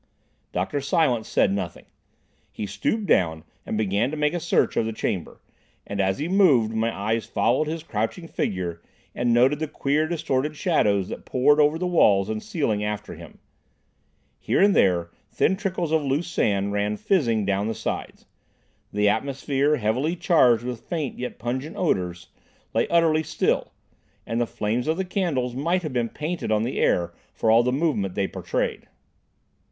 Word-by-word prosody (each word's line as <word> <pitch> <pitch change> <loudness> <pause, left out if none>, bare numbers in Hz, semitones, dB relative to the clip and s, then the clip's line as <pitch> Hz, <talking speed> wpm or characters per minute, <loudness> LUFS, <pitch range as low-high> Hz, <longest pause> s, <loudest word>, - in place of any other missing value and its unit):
Dr. 95 +11 -2
Silence 135 -5 +1
said 95 - +2
nothing. 95 -4 -4 0.7
He 105 - -5
stooped 200 - -2
down 80 - +2 0.2
and 110 - -2
began 105 +3 +1
to 155 - -5
make 150 +1 +1
a 175 - -1
search - - +1
of 110 - +1
the 115 - -3
chamber, 95 -4 -3 0.5
and 100 0 -2
as 95 0 +1
he 150 - -2
moved, 150 - +4
my 110 +1 0
eyes 110 +2 -2
followed 155 - +1
his 160 0 -4
crouching 115 - -3
figure 90 - -3 0.3
and 120 0 0
noted 130 +5 +4
the 155 - -2
queer 150 +2 0
distorted 150 -3 -1
shadows 105 - +1
that - - -7
poured 145 +4 +3
over 150 +1 +4
the 180 - -2
walls 105 - +3
and 110 0 -2
ceiling 110 -11 -1
after 105 0 -4
him. - - -12 1.0
Here - - 0
and 200 0 +5
there 85 -3 +2 0.2
thin 190 - +2
trickles 185 -5 -2
of 160 -1 +3
loose 145 +4 -1
sand 100 -9 0
ran 105 +1 -1
fizzing 115 - +1
down 100 +1 0
the 115 - -2
sides. - - -5 0.7
The 105 0 +1
atmosphere, 140 +6 +1
heavily 125 +8 0
charged 125 - +4
with 125 -2 -5
faint 155 -6 -4
yet 125 0 -5
pungent 130 - -4
odours, 90 - -1 0.4
lay - - +1
utterly 165 -2 +3
still, 155 0 -1 0.5
and 115 +1 -1
the 120 - 0
flames 110 +6 -2
of 160 +1 +1
the 190 - -1
candles 160 - -1
might 170 +8 0
have 155 -4 -4
been 120 -2 0
painted 155 -1 -4
on 105 0 +2
the 120 - -2
air 85 -1 +1 0.2
for 110 - +2
all 115 +1 +6
the 125 +1 0
movement 130 - 0
they 100 - +1
betrayed. - - -3
125 Hz, 170 wpm, -24 LUFS, 105-155 Hz, 1.0 s, all